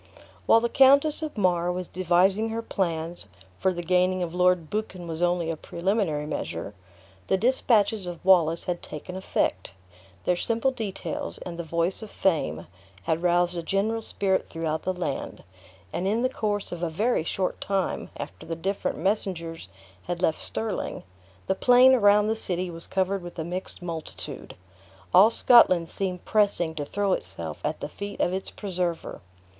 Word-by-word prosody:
While 225 - +6
the 235 - +1
Countess 280 +5 +5
of 310 -6 -5
Mar 180 -3 +2
was 180 0 -4
devising 185 +4 +2
her 225 +1 -3
plans 170 - -2 0.3
(for 190 - +2
the 175 -1 -5
gaining 180 +1 +2
of 170 -1 -4
Lord 180 -2 +3
Buchan 190 -5 -4
was 165 0 -5
only 175 -1 +1
a - - -3
preliminary 170 -2 -1
measure), 100 - -4 0.5
the 190 - +2
dispatches 220 -4 +2
of 175 0 -7
Wallace 170 -3 +4
had 175 -1 -3
taken 165 +4 -8
effect. 190 - -1 0.5
Their 180 - +2
simple 230 +7 0
details, 255 +5 -4
and 175 - -7
the - - -2
voice 170 +4 -1
of 220 - -8
fame, 145 - 0 0.4
had 160 +6 0
roused 175 0 +2
a 170 - -2
general 205 +6 0
spirit 195 -3 0
throughout 160 -1 -2
the 185 - -1
land; 170 -6 -4 0.5
and 185 - -1
in 220 +4 +1
the 255 - +2
course 205 -5 -2
of 175 -1 -5
a 170 - 0
very 210 +4 +1
short 185 +3 -2
time 195 -2 -1
after - - -7
the 165 - -3
different 195 +5 -2
messengers 170 - -2 0.4
had 175 -1 -3
left 160 -3 +1
Stirling, 220 -2 -3 0.4
the - - +1
plain 250 +5 +6
around 205 -3 +5
the 220 +1 +1
city 180 -4 -1
was 165 0 -7
covered 190 +1 0
with 175 0 -9
a 160 - -2
mixed 180 +2 -5
multitude. 165 -3 -6 0.6
All 195 +5 +8
Scotland 185 -8 +5
seemed 185 -2 -3
pressing 200 -6 +2
to 150 -2 -4
throw 200 +4 0
itself 85 - -5
at 150 +1 -2
the - - -3
feet 200 +6 -7
of 180 - +1
its 190 0 -3
preserver. 180 -4 -3
180 Hz, 170 wpm, -26 LUFS, 170-205 Hz, 0.6 s, All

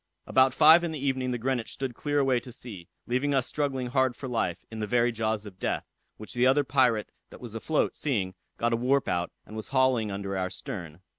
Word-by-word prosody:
About 130 0 +4
five 160 +5 +7
in 170 - -1
the 155 - -4
evening 130 -2 -1
the 125 - -1
Greenwich 120 -1 -2
stood 135 -2 -4
clear 145 +4 -2
away 135 -3 +3
to 125 - -11
sea, 100 -8 -9 0.2
leaving 135 +4 0
us 130 -2 +2
struggling 135 -3 -2
hard 130 0 +1
for 135 - -7
life, 115 -8 -2
in 110 - -6
the 105 - -2
very 120 +1 +3
jaws 110 -1 -1
of 95 -2 -11
death; - - -1 0.3
which 110 - -8
the 125 +1 +3
other 140 +2 +4
pirate 125 -5 +2 0.2
that - - -12
was 120 -3 -8
afloat, 145 +7 0
seeing, 105 -11 -1 0.2
got 120 0 +1
a - - +2
warp 130 +3 +2
out, 85 0 -1
and 110 - -11
was 110 - -5
hauling 130 -5 +2
under 100 0 -4
our 95 -1 -1
stern. 85 -3 -7
125 Hz, 225 wpm, -28 LUFS, 110-135 Hz, 0.3 s, five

